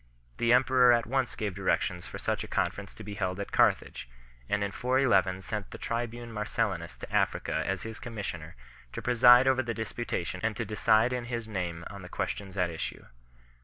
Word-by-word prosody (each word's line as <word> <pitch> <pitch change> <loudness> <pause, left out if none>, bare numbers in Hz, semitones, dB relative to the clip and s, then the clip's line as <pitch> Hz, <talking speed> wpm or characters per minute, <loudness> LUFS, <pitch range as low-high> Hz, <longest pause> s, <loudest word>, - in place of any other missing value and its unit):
The 120 0 +3
em 125 +2 +6
peror 125 -1 +5
at 115 - -4
once 130 +1 -1
gave 105 -3 -2
directions 90 -2 -1
for - - -7
such - - -2
a - - -7
conference 95 +3 -2
to 110 - -10
be 105 0 -6
held 95 -2 -2
at 100 - -5
Carthage - - +2 0.4
4, - - +1
and 105 - -1
in 100 - -2
411 100 -8 +2
sent 105 -1 -4
the - - -8
tribune 120 0 -4
Mar 105 -1 -2
cellinus - - -2
to - - -8
Africa - - +1
as 95 -1 -2
his 110 -1 -7
commissioner, 100 -9 -6 0.4
to - - -5
preside 125 +1 +7
over 130 -1 +4
the 120 -3 -3
disputation 110 -5 -3
and 110 -1 -1
to 115 - -2
decide 110 +3 +3
in 125 -1 -2
his 115 -2 -4
name 90 -5 -3
on 100 -1 -9
the 90 - -10
ques - - -1
tions 100 -1 -9
at 90 -2 +1
issue. 80 - -5
110 Hz, 205 wpm, -29 LUFS, 95-120 Hz, 0.4 s, preside